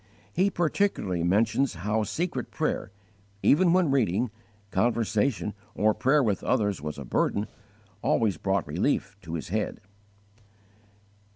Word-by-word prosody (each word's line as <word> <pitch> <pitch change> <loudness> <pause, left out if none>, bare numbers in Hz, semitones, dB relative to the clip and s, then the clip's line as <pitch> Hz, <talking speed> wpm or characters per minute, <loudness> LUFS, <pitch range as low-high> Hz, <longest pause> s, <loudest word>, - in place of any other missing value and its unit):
He 190 +3 +3
particularly 170 - 0
mentions 110 +8 +2
how 105 +6 0
secret 155 - -2
prayer, - - -2 0.5
even 170 +4 +5
when 180 -5 +3
reading, 120 -3 +1 0.4
conversation, 110 +1 +1 0.2
or 110 +1 +3
prayer 135 +6 +3
with 105 -5 0
others 105 - +1
was 75 0 -5
a 70 - -7
burden, 100 - 0 0.6
_always 105 -8 +1
brought 95 -3 +1
relief - - 0
to 85 0 -6
his 80 - -5
head. 105 +2 -2
110 Hz, 120 wpm, -27 LUFS, 95-135 Hz, 0.6 s, even